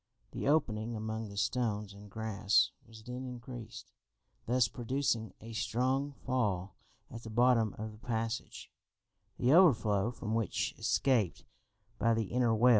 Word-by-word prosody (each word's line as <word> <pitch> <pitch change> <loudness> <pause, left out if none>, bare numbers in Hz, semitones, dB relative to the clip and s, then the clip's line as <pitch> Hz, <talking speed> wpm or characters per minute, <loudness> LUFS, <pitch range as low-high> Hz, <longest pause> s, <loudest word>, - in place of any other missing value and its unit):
The - - -3
opening 120 -7 +1
among 110 0 -4
the 100 - -10
stones 105 -1 -1
and 100 +1 -12
grass 110 -1 +2 0.2
was 110 -1 -13
then 125 +2 -6
increased, 125 -2 -8 0.6
thus 125 -1 +3
producing 120 -1 -1
a 115 +1 -9
strong 130 +5 0
fall 100 -8 0 0.4
at 115 - -7
the 110 - -8
bottom 115 -2 +3
of 110 +1 -5
the 105 - -14
passage, 115 0 -3 0.7
the 125 +4 +3
overflow 115 - +5
from 115 -2 -4
which 115 -4 0
escaped 120 -10 +1 0.5
by 115 0 +3
the 110 -4 -2
inner 125 -2 +3
well. 120 +3 +5
115 Hz, 140 wpm, -33 LUFS, 110-125 Hz, 0.7 s, overflow